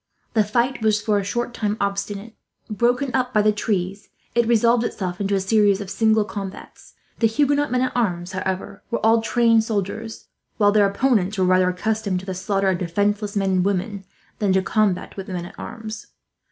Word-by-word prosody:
The 220 -2 +4
fight 240 +5 0
was, 215 -1 +2
for 210 -1 +1
a - - -3
short 240 +4 -2
time, 210 -2 -2
obstinate. 200 +2 -3 0.4
Broken 245 +5 +1
up 250 -2 0
by 210 - +4
the 215 - +4
trees, 200 -2 -2 0.2
it 235 -1 +2
resolved 235 +1 +3
itself 185 -5 -3
into 200 0 +1
a - - +2
series 200 0 +3
of 200 -2 -6
single 220 +1 +3
combats. 195 -2 -8 0.2
The 230 - +4
Huguenot 285 +4 +1
men 250 0 +2
at 255 - 0
arms, 180 -7 -1
however, 190 +1 -4
were 235 -2 -1
all 225 0 +5
tried 230 0 +3
soldiers; 220 +1 -4 0.3
while 205 -2 +4
their 205 -1 +4
opponents 210 -3 +1
were, 185 - +2
rather, 185 0 +4
accustomed 200 0 -1
to - - -12
the 190 - -4
slaughter 195 +1 0
of 185 -2 0
defenceless 205 +4 -1
men 195 -1 +1
and 185 -1 +2
women 200 +1 -2 0.4
than 205 -3 +1
to 190 - +4
a - - -9
combat 205 -2 0
with 195 - -6
men 180 -2 -4
at 175 - -12
arms. 220 -2 -7
205 Hz, 195 wpm, -22 LUFS, 195-225 Hz, 0.4 s, all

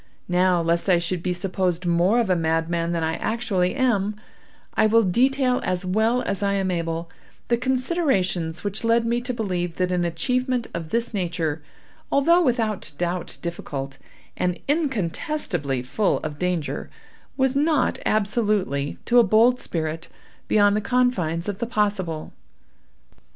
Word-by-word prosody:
Now, 180 -1 +2
lest 170 +3 0
I 180 - +6
should 170 +1 -2
be 180 - -1
supposed 180 -1 -1
more 175 +6 +3
of 225 -5 +1
a - - +4
madman 165 +1 0
than 170 -1 -1
I 160 0 -1
actually 215 -5 0
am, 215 -6 +1 0.6
I 215 - +3
will 230 +1 +4
detail, 255 +6 +2
as 185 0 -1
well 220 +6 +1
as 200 -1 -2
I 200 0 +1
am 190 -1 0
able, 165 -1 -3 0.4
the 235 - +3
considerations 250 - 0
which 205 +2 -3
led 230 0 +3
me 235 +1 0
to 250 +1 -3
believe 180 -7 -2
that 185 0 0
an 180 -1 +1
achievement 250 +9 0
of 165 -2 -5
this 235 +3 -1
nature, 170 -5 -2 0.5
although 335 +6 +4
without 230 - 0
doubt 175 0 -3
difficult, 140 -5 -5 0.4
and 180 -1 -1
incontestably 210 - -1
full 190 +11 +1
of 150 -1 -6
danger, 180 -4 -2 0.5
was 265 -1 +2
not 295 -1 +2
absolutely, 205 - 0
to 245 0 +5
a - - +7
bold 230 +4 +4
spirit, 160 -1 -4 0.4
beyond 205 -1 +4
the 215 - 0
confines 200 -10 0
of 205 -2 -3
the 235 - -2
possible. 200 -8 -1
190 Hz, 150 wpm, -23 LUFS, 170-235 Hz, 0.6 s, a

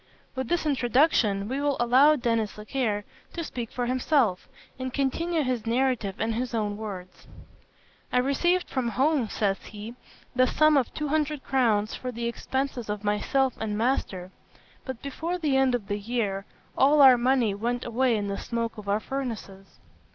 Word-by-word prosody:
With 260 -2 -3
this 345 +2 0
introduction, 245 -7 +2
we 265 +4 -2
will 285 -1 +1
allow 260 +6 +5
Denis 230 -5 0
Zachaire 210 -1 -2 0.3
to 335 - -3
speak 240 -7 -5
for 245 - -2
himself, 255 - +1 0.3
and 260 0 -3
continue 310 +5 0
his 250 -4 -2
narrative 235 -5 0
in 225 +1 0
his 240 +1 -2
own 210 -2 -1
words: 195 -4 -8 0.8
"I - - +1
received 345 +8 +2
from 255 -3 -1
home," 265 0 +1
says 200 -2 0
he, 215 +2 -8 0.4
"the 255 +1 +4
sum 310 +3 +4
of 265 -4 +2
two 300 -1 -3
hundred 300 -2 0
crowns 225 -6 +1
for 255 - -5
the 235 0 -4
expenses 255 0 -3
of 210 0 -3
myself 245 +5 +1
and 210 -2 -2
master; 205 -6 -1 0.5
but 260 -3 -6
before 325 +6 -3
the 300 -6 0
end 265 -2 +3
of 230 -5 -4
the 205 0 -2
year, 205 -3 -2 0.3
all 285 +2 +5
our 260 -2 +9
money 245 -3 +2
went 240 +4 -2
away 240 +1 +1
in 205 -1 -2
the 200 0 -3
smoke 230 -2 -3
of 200 -1 -7
our 205 +1 +2
furnaces. 220 -7 -6
245 Hz, 170 wpm, -26 LUFS, 215-270 Hz, 0.8 s, our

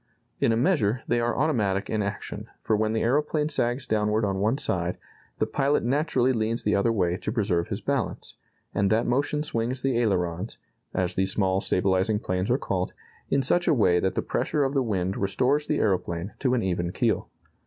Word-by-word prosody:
In - - +3
a 115 - +2
measure, 125 - +1
they 120 - +2
are 120 0 0
automatic 105 -10 +1
in 110 - -1
action, 100 -1 -5
for 110 - 0
when 110 +1 0
the 110 - 0
aeroplane 150 +4 +1
sags 125 -3 -1
downward 105 -1 +1
on 95 -1 -1
one 110 +6 +1
side, 90 - -1 0.4
the - - +1
pilot 140 +2 +1
naturally 130 0 +2
leans 115 0 -1
the 105 - +2
other 100 +4 +2
way 90 -5 +1
to 105 - -4
preserve 100 -7 0
his - - -4
balance, - - -2 0.4
and 100 -1 +2
that 110 +2 +2
motion 145 +4 0
swings 125 -2 -2
the 130 -3 +1
ailerons 95 -2 -1 0.3
(as 90 -1 -1
these 95 +1 0
small 95 -2 +1
stabilizing 95 +3 +1
planes 90 -2 -2
are 125 - +3
called) 95 -9 -2 0.4
in 140 -1 +2
such 175 +7 +2
a - - +4
way 90 -7 +4
that 95 +1 -1
the - - 0
pressure 150 - 0
of 135 0 0
the 135 - +2
wind 95 -5 -1
restores 130 +10 +1
the 150 - +1
aeroplane 90 -1 -1
to 130 -2 +2
an 120 - 0
even 85 -2 -1
keel. - - 0
110 Hz, 195 wpm, -26 LUFS, 95-130 Hz, 0.4 s, a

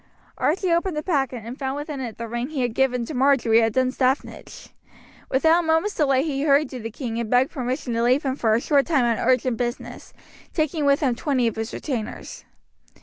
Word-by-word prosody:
Archie 360 +3 +1
opened 340 -1 0
the 300 - -2
packet 270 - -1
and 245 +4 -8
found 265 -1 -2
within 290 -1 -5
it 240 -4 -6
the 230 - -5
ring 240 +3 -3
he 285 -5 -2
had 240 -2 -1
given 250 -2 +1
to 310 - -7
Marjory 250 -4 +3
at 225 -1 +1
Dunstaffnage. 260 +1 -1 0.6
Without 320 +6 +3
a - - -6
moment's 325 +6 +2
delay 275 -3 +2
he 280 -3 -2
hurried 285 -1 +3
to 255 - -6
the 225 0 -5
king 230 0 -5
and 230 -2 -3
begged 250 +3 +3
permission 255 -2 -3
to 230 - 0
leave 250 +5 +2
him 265 -2 -1
for 220 -5 +2
a - - +2
short 280 0 +2
time 285 -7 +2
on 230 -2 0
urgent 255 -2 +2
business, 240 +1 -5 0.4
taking 310 -1 0
with 280 +1 +3
him 265 -4 +2
twenty 255 0 0
of 230 - 0
his 225 +1 -4
retainers. 240 -7 -5
265 Hz, 210 wpm, -23 LUFS, 240-295 Hz, 0.6 s, Marjory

